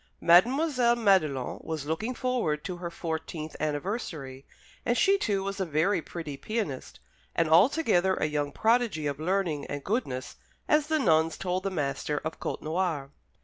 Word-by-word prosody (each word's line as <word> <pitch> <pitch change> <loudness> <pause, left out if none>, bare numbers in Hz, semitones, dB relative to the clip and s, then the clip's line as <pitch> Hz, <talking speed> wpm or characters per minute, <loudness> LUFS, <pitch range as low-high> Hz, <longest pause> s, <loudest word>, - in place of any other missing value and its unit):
Mademoiselle 245 - +4
Madelon 185 - +2
was 160 -3 -4
looking 215 +11 -2
forward 235 -14 -1
to 180 -2 -5
her 175 -1 -5
fourteenth 160 -2 -5
anniversary, 150 - -3 0.4
and 240 0 +1
she, 390 - +5
too, 205 - 0
was 195 +1 -4
a - - +1
very 165 +3 +1
pretty 160 -3 -6
pianist, 185 - -4 0.4
and 165 - +2
altogether 190 - +4
a - - 0
young 145 -1 -1
prodigy 225 -6 +1
of 145 0 -2
learning 170 -3 0
and 145 -1 -5
goodness, 130 - -3 0.3
as 300 -1 +3
the 315 0 +2
nuns 160 - +3
told 185 0 -1
the 195 - -2
master 150 -3 -2
of 160 - -4
Côtenoir. 155 -4 -2
175 Hz, 150 wpm, -28 LUFS, 150-220 Hz, 0.4 s, she